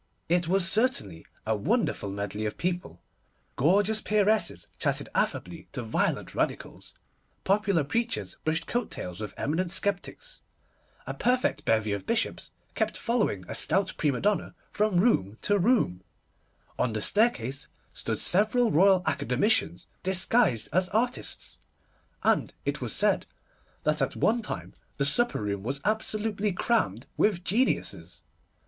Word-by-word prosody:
It 175 0 +1
was 190 +1 +3
certainly 190 - +1 0.2
a 110 0 +1
wonderful 205 - 0
medley 100 +2 -3
of 105 - -6
people. 175 - -3 0.5
Gorgeous 200 - +3
peeresses 215 +1 +2
chatted - - -1
affably - - -2
to - - -4
violent - - -1
Radicals, - - -3 0.5
popular 200 -4 +2
preachers 230 - -2
brushed 160 +1 -1
coat 240 -1 -2
tails 90 +1 -6
with 105 -2 -6
eminent 170 +5 -1
sceptics, 200 - -2 0.6
a - - -4
perfect 250 +1 0
bevy 110 -1 +2
of 100 - -5
bishops 225 0 -1 0.2
kept - - -1
following 220 - 0
a - - -5
stout 190 - +2
prima 140 -5 0
donna 205 0 0 0.2
from 210 -4 +1
room 110 - +2
to 205 -1 +2
room, 175 - +2 0.8
on 120 -3 +1
the 110 - -2
staircase 140 - +1 0.3
stood - - -2
several 215 +5 +3
Royal 185 +2 +5
Academicians, 170 - +1 0.2
disguised 185 - +3
as 185 +1 +3
artists, 240 +4 -2 0.6
and - - +2
it - - -2
was - - -2
said - - +2 0.6
that - - +1
at - - 0
one 235 +2 +2
time 210 - -6 0.2
the 140 - +1
supper 240 - +2
room 100 -1 -2
was 135 +7 -1
absolutely 215 -1 0
crammed 175 - 0
with 190 -5 +2
geniuses. 100 - 0
185 Hz, 135 wpm, -28 LUFS, -, 0.8 s, Royal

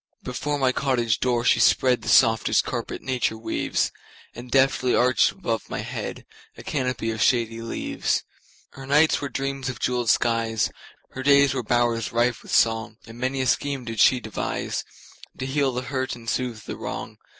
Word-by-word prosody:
Before 145 +4 -2
my 130 -2 +2
cottage 125 -5 0
door 120 -1 0
she - - +4
spreadThe 125 -3 +3
softest 115 -1 +4
carpet - - -5
nature 125 -4 -1
weaves, 110 - -1 0.4
And 120 +1 -10
deftly 130 -1 +3
arched 125 +1 +4
above 115 -12 -4
my - - -3
headA - - -6 0.4
canopy 125 -5 -2
of 110 - -4
shady 115 -2 +2
leaves. 115 - -2 0.5
Her 135 0 -11
nights 150 +3 +4
were 140 - -3
dreams 135 -1 -3
of 130 - -6
jeweled 125 -2 0
skies, 115 -2 +1 0.4
Her 130 - -6
days 140 0 +5
were 130 - -1
bowers 120 -1 0
rife 120 0 +1
with - - -11
song, 115 -1 +2
And 115 +1 -12
many 130 +1 -1
a - - 0
scheme 135 0 0
did 115 -2 -5
she 125 - +5
deviseTo 110 -3 -3 0.6
heal 135 +1 0
the 125 0 -3
hurt 130 0 -3
and 115 -1 -13
soothe 120 -3 -2
the - - -6
wrong. - - -6
125 Hz, 165 wpm, -24 LUFS, 115-135 Hz, 0.6 s, days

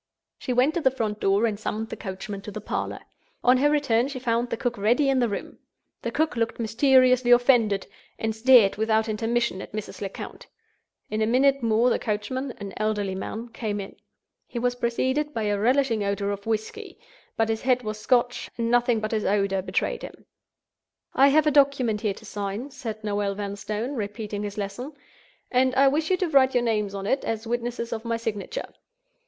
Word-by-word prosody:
She - - -4
went 255 +5 +3
to 340 - -1
the 265 - +4
front 220 -5 -3
door, 200 +3 +2
and 210 -3 -1
summoned 220 +1 -3
the - - -5
coachman 195 +1 -6
to 210 - -8
the - - -6
parlor. - - -4 0.4
On 250 +1 +5
her 290 +3 +3
return, 270 -5 +2
she 280 -1 -6
found 240 -1 0
the - - -2
cook 240 0 -1
already 245 +7 +3
in 270 -1 +3
the 240 -2 +2
room. 200 - -6 0.4
The - - -2
cook 315 -4 0
looked 230 0 -1
mysteriously 255 +2 +4
offended, 240 -5 +4 0.3
and 220 -1 -2
stared 230 -4 +6
without 220 +1 +1
intermission 225 -2 -1
at - - -10
Mrs. 215 -1 -6
Lecount. 195 -1 -7 0.6
In 215 +1 -1
a 215 - +2
minute 270 +3 +3
more 230 +2 +3
the - - +1
coachman—an 215 0 -4
elderly 210 -2 -1
man—came 220 +2 -4
in. 195 - -7 0.5
He - - -7
was 245 +1 +1
preceded 260 +4 -1
by 225 - -1
a 205 -1 0
relishing 240 -1 +2
odor 200 0 -1
of 200 +1 -6
whisky; 220 -1 -3 0.4
but 225 0 +2
his 220 0 -1
head 250 -1 +2
was 215 -1 -4
Scotch; 245 +1 +1
and 230 0 -1
nothing 240 -2 +3
but 215 - -3
his 215 -2 0
odor 195 -1 +1
betrayed 185 - -1
him. - - -10 0.9
"I 275 - +6
have 305 +2 +4
a 300 - +4
document 275 -7 +3
here 205 -3 -1
to 220 - -13
sign," 205 +6 -4
said 225 -6 -6
Noel 205 -1 -1
Vanstone, 210 +5 -4
repeating 210 -3 -4
his 205 0 -5
lesson; 210 +8 -5 0.6
"and 255 +1 +2
I 275 +1 +5
wish 310 +3 0
you 370 - +3
to 365 - 0
write 265 -3 +4
your 245 - +3
names 210 -4 0
on 195 0 -5
it, 265 +6 0
as 225 0 -3
witnesses 235 0 -3
of 220 -1 -5
my 230 -1 -1
signature." 225 - -4
230 Hz, 195 wpm, -25 LUFS, 210-255 Hz, 0.9 s, stared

